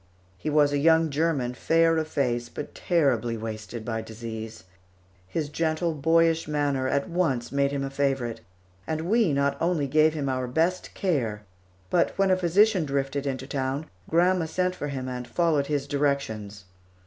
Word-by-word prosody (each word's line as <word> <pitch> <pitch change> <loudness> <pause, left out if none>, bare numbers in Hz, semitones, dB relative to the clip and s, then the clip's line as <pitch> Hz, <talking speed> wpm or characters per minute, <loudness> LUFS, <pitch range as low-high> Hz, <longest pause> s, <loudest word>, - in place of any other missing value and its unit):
He 155 - -4
was 145 -1 +3
a 145 - +1
young 160 +1 +4
German, 140 -5 0
fair 165 +5 +3
of 160 -1 -1
face, 120 -5 -1
but - - -7
terribly 125 -9 +1
wasted 110 +1 -6
by 110 -1 -2
disease. 110 -1 -7 0.6
His 150 - -2
gentle, 160 +2 -1
boyish 165 +2 +2
manner 145 -3 0
at 140 +1 0
once 160 -10 -1
made 140 0 +2
him 140 -1 -2
a 135 - -4
favorite, 135 -5 -1 0.5
and 155 0 -2
we 205 +1 +2
not 140 0 0
only 165 -3 +1
gave 155 +3 +3
him 145 -3 -2
our 130 -1 -1
best 165 +8 -1
care, 120 - -1 0.5
but 170 - +2
when 195 -1 +3
a - - +5
physician 185 +2 +3
drifted 140 0 -2
into 130 -1 -3
town, 135 +2 -2 0.2
grandma 175 +1 +3
sent 180 +2 0
for 145 -5 -5
him 135 -2 -4
and 125 -1 -5
followed 155 -4 +1
his 145 -2 -1
directions. 125 -9 -2
140 Hz, 165 wpm, -26 LUFS, 130-165 Hz, 0.6 s, a